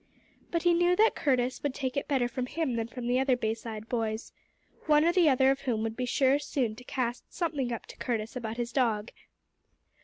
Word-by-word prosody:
But 335 -1 -1
he 350 -1 +5
knew 350 +1 +3
that 440 +4 +4
Curtis 255 -2 0
would 285 -2 -2
take 260 -2 -3
it 280 - -2
better 265 -4 +1
from 250 +1 -4
him 315 -2 -1
than 230 -1 -1
from 245 0 -7
the 245 +1 +2
other 265 -1 +2
Bayside 220 -1 -4
boys, 225 -2 -2 0.5
one 300 0 +5
or 340 - +5
the 345 -3 +4
other 265 0 +4
of 275 0 -2
whom 235 -5 -1
would 225 0 -2
be 250 0 -2
sure 270 +3 +3
soon 255 -6 -1
to 250 - -11
cast 245 -1 -3
something 295 -8 -2
up 230 - -4
to - - -12
Curtis 225 -2 -3
about 230 -2 -4
his 240 0 -2
dog. 230 -4 0
255 Hz, 215 wpm, -29 LUFS, 235-280 Hz, 0.5 s, he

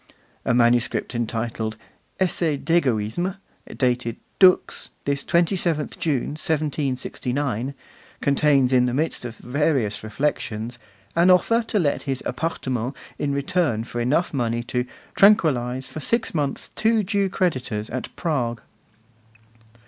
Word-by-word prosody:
A 125 - +2
manuscript 120 +1 +2
entitled 115 -1 -2 0.4
'Essai 170 -4 +2
d'Egoisme,' 140 - 0 0.4
dated, 125 -3 +1 0.2
'Dux, 185 -1 +4 0.2
this 140 0 +1
27th 170 -3 +1
June, 145 -3 0
1769,' 140 -4 -1 0.4
contains, 140 -2 +3
in 125 -1 +4
the 125 - -1
midst 155 -3 -1
of 120 -1 -6
various 130 -6 0
reflections, 115 -1 -2 0.4
an 170 +2 +5
offer 230 +6 +4
to 215 - 0
let 150 -7 +1
his 135 -1 -1
'appartement' 130 -4 -2 0.2
in 145 - 0
return 140 -4 0
for 120 +1 -4
enough 150 +9 +1
money 120 -3 -1
to 125 +1 -2 0.3
'tranquillise 130 - +4
for - - -7
six 230 +9 0
months 145 -4 -2
two 220 -1 +2
Jew 200 0 +1
creditors 130 - -1
at 125 +1 -4
Prague. 125 - -1
135 Hz, 120 wpm, -23 LUFS, 120-165 Hz, 0.4 s, an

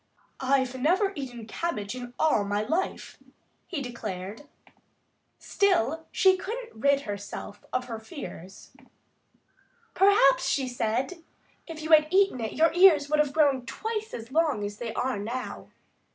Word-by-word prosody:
"I've 260 -1 +1
never 375 +8 +2
eaten 245 -6 -6
cabbage 215 -4 -3
in 245 -1 -8
all 310 -10 +3
my 205 +1 -1
life," 325 - -3 0.5
he 300 -6 -4
declared. 220 0 -6 0.9
Still 325 - +1
she 380 -1 +4
couldn't 460 +6 -6
rid 280 +5 +2
herself 205 -2 -7
of 255 0 -1
her 230 -3 -6
fears. 220 - -10 1.2
"Perhaps," 385 -8 +4
she 270 -2 0
said, 250 +8 -2 0.4
"if 320 -2 -8
you 315 - -4
had 305 -1 +7
eaten 385 -8 +3
it 220 - -3
your 325 0 +3
ears 325 -5 +6
would 305 - +3
have 295 -2 +2
grown 280 -4 +2
twice 440 -1 -4
as 230 +2 -9
long 305 -8 +1
as 205 0 -5
they 235 -2 -4
are 250 -4 -1
now." 240 +5 -5
275 Hz, 140 wpm, -27 LUFS, 230-330 Hz, 1.2 s, had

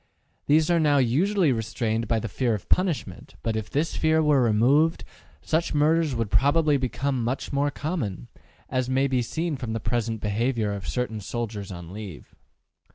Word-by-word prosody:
These 155 +3 +4
are 170 - +3
now 150 -2 +3
usually 160 - +2
restrained 115 -1 -2
by 115 0 +1
the 115 - -4
fear 115 +3 0
of 100 - -8
punishment, 180 -5 -1
but 115 -1 -1
if 110 -1 -3
this 155 +4 -1
fear 160 0 +2
were 150 -3 +4
removed, 130 +9 +3 0.4
such 160 0 0
murders 155 -1 +2
would 115 -3 -2
probably 150 +2 +3
become 130 -1 -1
much 130 +4 -3
more 140 +1 +2
common, 140 - -4 0.4
as 130 0 -1
may 135 +1 +2
be 130 -2 +1
seen 160 +5 -2
from 125 -4 -4
the 115 - -2
present 115 0 -2
behavior 110 +1 -1
of 100 -1 -6
certain 125 -3 -2
soldiers 105 -2 -5
on 85 -1 -8
leave. 100 -7 -9
125 Hz, 170 wpm, -25 LUFS, 110-150 Hz, 0.4 s, These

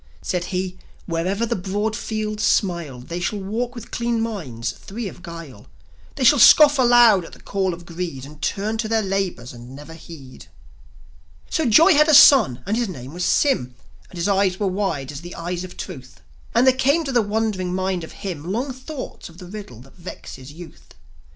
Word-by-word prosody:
Said 180 -2 -2
he: 185 0 -4 0.3
"Wherever 185 +6 -1
the - - -1
broad 205 +4 -2
fields 215 -1 -4
smile, 170 - 0
They 170 +7 -6
shall 190 +4 -2
walk 230 +6 -3
with 235 -2 -10
clean 235 -1 -1
minds, 145 - -4
free 210 - -7
of 180 - -10
guile; 165 - -10 0.5
They 275 - -2
shall 265 +3 +6
scoff 290 +4 +7
aloud 240 -6 +6
at - - -12
the - - -13
call 195 -2 -1
of 175 0 -9
Greed, 170 -6 -6
And 150 +1 -14
turn 215 +8 -2
to 220 - -1
their 225 0 +1
labours 190 -11 -3
and 120 +2 -11
never 150 +3 -11
heed." 150 -6 -12 1.0
So 320 -4 +1
Joi 325 - +6
had 300 +1 +5
a 310 - +7
son, 225 - +7
and 210 - -1
his 235 -2 -1
name 130 -5 -8
was 180 +1 -4
Sym; 125 - +1 0.3
And 180 - -12
his 170 - -1
eyes 195 -2 +1
were 205 - 0
wide 185 -8 -2
as 145 0 -8
the 175 +1 -9
eyes 175 +1 -4
of 185 - -10
Truth; 130 -9 -9 0.3
And 240 +2 +4
there 260 - +6
came 280 +5 +2
to 275 - -3
the 245 -2 +3
wondering 205 -3 -1
mind 185 -1 -2
of 160 - -9
him 175 -2 -4
Long 255 +6 -2
thoughts 260 - -8
of 165 - -17
the 180 - -10
riddle 180 - -9
that 135 +6 -18
vexes 145 -6 -10
youth. 170 +2 -14
190 Hz, 195 wpm, -22 LUFS, 165-225 Hz, 1.0 s, scoff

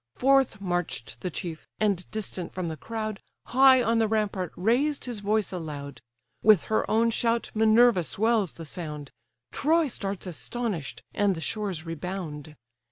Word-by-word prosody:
Forth 270 -4 +3
march'd 175 - -2
the 180 - -3
chief, 165 -2 -6
and 200 -4 0
distant 190 -5 -5
from 180 -2 -2
the 160 - -4
crowd, 215 +2 -5 0.2
High 260 0 +6
on 230 0 +2
the 225 - +3
rampart 210 -5 -1
raised 255 +10 +1
his 240 -4 -3
voice 210 0 0
aloud; 145 -7 -6 0.4
With 215 -4 +6
her 220 - 0
own 230 +1 +3
shout 230 0 0
Minerva 220 -2 +5
swells 215 +1 +1
the 165 - -9
sound; 150 -3 -6 0.4
Troy 320 +2 +2
starts 200 -6 -4
astonish'd, 190 - -4
and 205 -2 +2
the - - -5
shores 190 -3 -3
rebound. 165 -3 -6
205 Hz, 150 wpm, -27 LUFS, 175-230 Hz, 0.4 s, High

